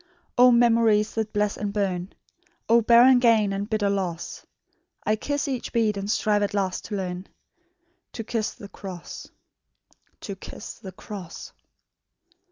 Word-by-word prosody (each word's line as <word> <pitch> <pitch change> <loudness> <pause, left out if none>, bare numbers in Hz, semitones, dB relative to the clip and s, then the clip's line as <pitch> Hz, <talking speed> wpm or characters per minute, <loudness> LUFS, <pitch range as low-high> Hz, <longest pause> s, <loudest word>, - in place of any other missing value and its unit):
"O 250 0 +7
memories 230 -3 +4
that 220 -1 -2
bless 210 -1 0
and 205 -1 -3
burn! 195 -3 -2 0.6
O 235 +1 +5
barren 240 +3 +7
gain 225 -4 +3
and 200 +2 -3
bitter 215 -2 +1
loss! 185 -4 -3 0.6
I 215 - +2
kiss 285 +6 -2
each 260 -3 -3
bead, 220 -3 +1
and 200 0 -4
strive 210 -1 +2
at 205 0 -1
last 190 -2 -1
to 210 - -4
learn 185 -1 -4 0.9
To 225 - -5
kiss 225 -1 -2
the 215 -5 -10
cross... 185 -4 -9 0.9
to 200 - -6
kiss 190 - -9
the 190 - -9
cross." 185 -2 -9
210 Hz, 145 wpm, -25 LUFS, 195-230 Hz, 0.9 s, O